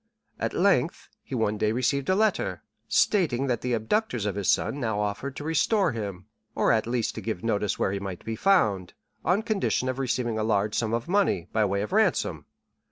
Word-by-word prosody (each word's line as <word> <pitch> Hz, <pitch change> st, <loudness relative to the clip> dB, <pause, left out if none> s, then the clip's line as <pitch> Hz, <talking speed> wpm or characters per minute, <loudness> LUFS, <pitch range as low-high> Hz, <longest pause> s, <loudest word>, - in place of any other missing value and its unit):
At -, -, -2 dB
length, 185 Hz, -3 st, +1 dB
he 135 Hz, -, -6 dB
one 105 Hz, -3 st, 0 dB
day 105 Hz, -, +2 dB
received 130 Hz, +5 st, 0 dB
a 185 Hz, -, +4 dB
letter, 215 Hz, +1 st, 0 dB, 0.2 s
stating 155 Hz, -, +2 dB
that 125 Hz, -4 st, -1 dB
the 125 Hz, -1 st, -1 dB
abductors 120 Hz, -, 0 dB
of 105 Hz, -, 0 dB
his 100 Hz, -1 st, -1 dB
son 145 Hz, -, +1 dB
now 110 Hz, -5 st, -1 dB
offered 105 Hz, +7 st, -3 dB
to -, -, -6 dB
restore 165 Hz, +4 st, +2 dB
him, 100 Hz, -5 st, -5 dB, 0.3 s
or -, -, +3 dB
at 110 Hz, 0 st, +1 dB
least 120 Hz, -2 st, -1 dB
to -, -, -6 dB
give 110 Hz, -6 st, -4 dB
notice 105 Hz, -3 st, 0 dB
where -, -, 0 dB
he 100 Hz, -, -2 dB
might 95 Hz, -3 st, -7 dB
be 115 Hz, -, -3 dB
found, 105 Hz, -, +2 dB, 0.3 s
on 195 Hz, +5 st, +2 dB
condition 210 Hz, -, 0 dB
of 130 Hz, +1 st, -3 dB
receiving 120 Hz, -3 st, -1 dB
a -, -, 0 dB
large 105 Hz, -1 st, +1 dB
sum 115 Hz, -1 st, 0 dB
of 115 Hz, -, -4 dB
money, 185 Hz, -, +1 dB
by 110 Hz, -1 st, +3 dB
way 100 Hz, 0 st, 0 dB
of 105 Hz, -, -6 dB
ransom. -, -, +1 dB
115 Hz, 205 wpm, -26 LUFS, 105-145 Hz, 0.3 s, a